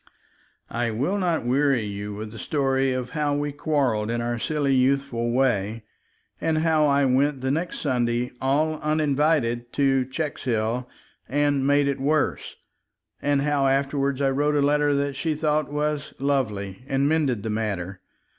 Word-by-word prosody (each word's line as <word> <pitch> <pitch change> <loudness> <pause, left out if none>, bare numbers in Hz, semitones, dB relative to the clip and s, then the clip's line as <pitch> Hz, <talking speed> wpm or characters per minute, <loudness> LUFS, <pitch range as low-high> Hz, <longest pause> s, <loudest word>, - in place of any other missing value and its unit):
I 120 0 -1
will 140 - -1
not 170 -8 0
weary 135 -1 +2
you 100 0 -5
with 105 +1 -6
the 110 - -9
story 135 -2 +1
of 130 -1 -3
how 150 -2 0
we 145 0 -1
quarreled 135 -8 0
in 120 0 -1
our 120 0 -2
silly 145 0 0
youthful 130 -2 +1
way, 115 -4 0 0.6
and 160 -1 +1
how 155 -1 +3
I 140 0 +3
went 135 +1 +2
the 130 0 0
next 165 +4 -2
Sunday, 125 -3 0
all 155 +4 +1
uninvited, 145 -5 +1
to 135 -2 +2
Checkshill, 125 -4 -2 0.4
and 145 -1 +1
made 145 0 +3
it 140 -1 -1
worse, 145 +2 0 0.7
and 140 -1 +1
how 145 -2 +2
afterward 140 0 0
I 135 - +3
wrote 145 +2 +1
a 145 - +3
letter 145 0 +2
that 140 0 -1
she 160 +1 -1
thought 150 -1 0
was 150 0 -2
"lovely," 110 -8 -2
and 135 0 +1
mended 145 -9 +1
the 110 - -2
matter. 100 -4 -3
140 Hz, 155 wpm, -24 LUFS, 120-145 Hz, 0.7 s, how